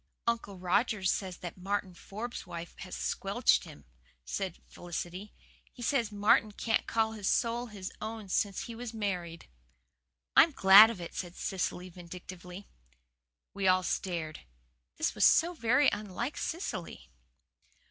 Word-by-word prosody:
"Uncle 230 -4 -1
Roger 195 +3 +1
says 185 -1 0
that 180 +1 -8
Martin 195 0 -2
Forbes' 215 +4 -7
wife 170 -1 -7
has - - -7
squelched - - +1
HIM," 70 - -13 0.4
said 190 - -3
Felicity. 175 +3 -6 0.4
"He 245 - -10
says 235 -4 +1
Martin 210 +1 +3
can't 225 +2 0
call 225 -1 +1
his 210 -3 -2
soul 235 +1 +1
his 200 -4 -7
own 220 -1 -5
since 195 +1 0
he 235 - -6
was 235 0 -7
married." 180 -6 -3 0.9
"I'm 320 0 +7
glad 200 0 +9
of 230 -5 -5
it," 170 - -7
said 175 -1 -5
Cecily 185 -1 -3
vindictively. 180 +2 -10 0.9
We 195 -1 0
all 185 0 +4
stared. 170 -4 -3 0.6
This - - 0
was - - 0
so 345 +2 +5
very 260 -1 +3
unlike 210 +6 -4
Cecily. 175 - -5
195 Hz, 135 wpm, -31 LUFS, 180-225 Hz, 0.9 s, glad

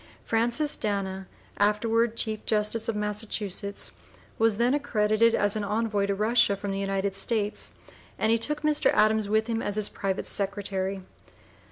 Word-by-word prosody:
Francis 240 +7 +2
Dana, 195 -2 -3 0.3
afterward 225 +3 +2
Chief 215 -1 -2
Justice 215 +1 +1
of 225 - -1
Massachusetts, 210 -1 -3 0.5
was 225 -2 +3
then 240 +3 +2
accredited 230 -5 +2
as 205 0 +2
an 215 - -2
envoy 210 -1 0
to 200 - 0
Russia 215 0 +3
from 200 0 -4
the 195 - -2
United 195 0 -1
States, 205 +1 -1 0.4
and 220 - +2
he 230 - +3
took 300 +6 0
Mr. 300 -1 +3
Adams 215 -1 +3
with 220 +1 +2
him 230 -1 -2
as 205 - -3
his 215 -1 +1
private 195 -1 -3
secretary. 195 -1 -2
210 Hz, 155 wpm, -27 LUFS, 200-225 Hz, 0.5 s, was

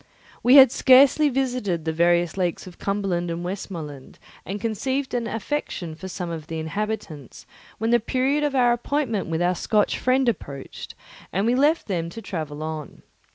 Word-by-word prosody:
We 250 +3 +5
had 265 -3 +9
scarcely 275 +4 +5
visited 245 - -1
the 160 - -1
various 170 +1 +2
lakes 180 -2 -2
of 180 -2 -13
Cumberland 195 -4 -1
and 170 +1 -4
Westmorland 165 -7 -7 0.3
and 200 +2 -4
conceived 260 +5 -2
an 240 -2 -1
affection 225 - -4
for 180 +4 -8
some 180 -2 -5
of 160 -2 -6
the 165 - -5
inhabitants 160 - -5 0.3
when 225 +2 -1
the 240 - +5
period 260 +6 0
of 290 -2 0
our 245 -2 +4
appointment 240 -3 -1
with 165 +1 -1
our 180 +1 +2
Scotch 210 +3 0
friend 255 0 +2
approached, 140 - -5 0.4
and 195 +3 0
we 235 - +3
left 295 +6 +2
them 170 -4 -2
to 225 - -8
travel 155 -8 -5
on. 155 -2 -7
200 Hz, 170 wpm, -24 LUFS, 170-250 Hz, 0.4 s, had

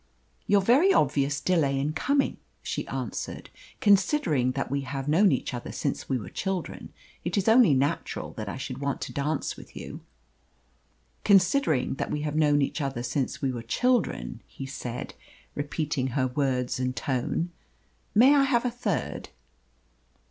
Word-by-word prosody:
"Your 200 0 +4
very 275 - +5
obvious 145 - +2
delay 145 -4 +1
in 145 +3 -1
coming," 275 - +1 0.3
she - - -3
answered. - - -5 0.3
"Considering 190 - +3
that 135 0 -3
we 140 0 0
have 135 0 -5
known 180 +6 +5
each 130 - -1
other 120 - -5
since 140 - -3
we 130 - +1
were 105 -6 -7
children, 190 -3 -4 0.3
it - - -2
is 200 - +1
only 225 - +6
natural 135 +2 -1
that 105 -2 -5
I 135 - -5
should 130 0 -5
want 140 0 -2
to - - -5
dance 145 +1 -1
with - - -14
you." - - -8 1.2
"Considering 190 - +3
that - - -2
we 150 - -2
have 150 0 -2
known 145 -2 +4
each 145 - -2
other 135 -4 -2
since 130 +3 -2
we 135 - +2
were 120 -2 -5
children," 220 - 0
he 135 - -8
said, 125 -3 -6 0.4
repeating 145 -2 -2
her 130 0 0
words 130 -1 -1
and 130 0 -1
tone, 135 +7 -1 0.6
"may 255 +7 +7
I 285 - +5
have 250 -2 +2
a 250 - +1
third?" 245 +1 -3
145 Hz, 160 wpm, -27 LUFS, 130-195 Hz, 1.2 s, may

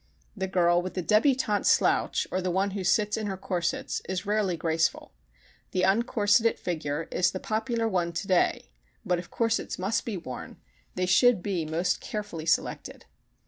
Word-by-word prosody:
The 190 -2 -2
girl 175 -2 +3
with 185 +1 -6
the 185 - -2
débutante 215 - +2
slouch - - +2
or 185 - -1
the 185 - -1
one 190 +3 0
who 195 -1 -4
"sits 210 +3 +2
in 215 -1 -3
her 190 -1 -3
corsets" 180 -3 -2
is 190 +2 -2
rarely 205 -4 0
graceful. 165 +1 0 0.6
The 185 - +1
uncorseted 220 +2 +3
figure 160 -2 -3
is 180 0 +2
the 185 - -5
popular 225 +2 -1
one 180 -5 0
today 180 - 0 0.3
but 180 -1 +1
if 175 - -9
corsets 230 -1 -1
must 205 +3 -1
be 220 -5 -4
worn 130 -7 -8 0.4
they 185 - 0
should 190 +2 +4
be 185 -6 -1
most 165 +3 0
carefully 190 -7 -5
selected. - - -1
190 Hz, 165 wpm, -27 LUFS, 175-210 Hz, 0.6 s, should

